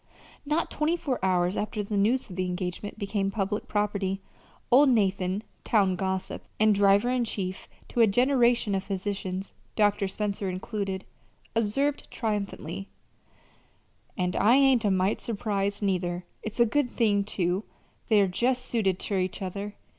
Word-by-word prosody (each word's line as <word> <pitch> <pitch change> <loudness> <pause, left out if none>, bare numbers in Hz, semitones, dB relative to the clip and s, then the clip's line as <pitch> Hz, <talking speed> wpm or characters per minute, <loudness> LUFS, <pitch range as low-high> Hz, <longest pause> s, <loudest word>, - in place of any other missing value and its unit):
Not 305 +3 0
twenty 310 +3 +1
four 280 - -3
hours 180 0 +2
after 210 0 -2
the 205 +1 -4
news 225 +6 +2
of 185 - -9
the 185 0 -1
engagement 180 +3 -4
became 200 -1 -1
public 200 +1 -2
property, 200 -2 -1 0.5
old 275 +3 +7
Nathan 195 -3 +1 0.2
town 195 -4 +3
gossip, 190 0 -3 0.2
and 215 0 +5
driver 200 +4 +4
in 255 -1 +1
chief 190 -4 -4 0.2
to 240 - +1
a 225 - +7
generation 240 -1 +3
of 190 -1 0
physicians, 195 -1 -4 0.2
Dr. 205 -1 +2
Spencer 200 0 -2
included 190 +1 -4 0.5
observed 275 +7 0
triumphantly: 200 -5 -3 1.3
"And 180 -1 0
I 225 +5 +5
ain't 270 -4 +5
a - - +4
mite 190 +1 +1
surprised, 205 -2 -2
neither. 180 -2 -1 0.2
It's 220 +2 -6
a 235 - +7
good 250 +3 +1
thing, 205 -5 +2
too. 185 -1 -1 0.4
They're 210 -3 +5
jest 250 +7 0
suited 200 -7 +1
ter 195 0 -1
each 185 0 -2
other. 200 +2 -5
205 Hz, 145 wpm, -27 LUFS, 190-225 Hz, 1.3 s, old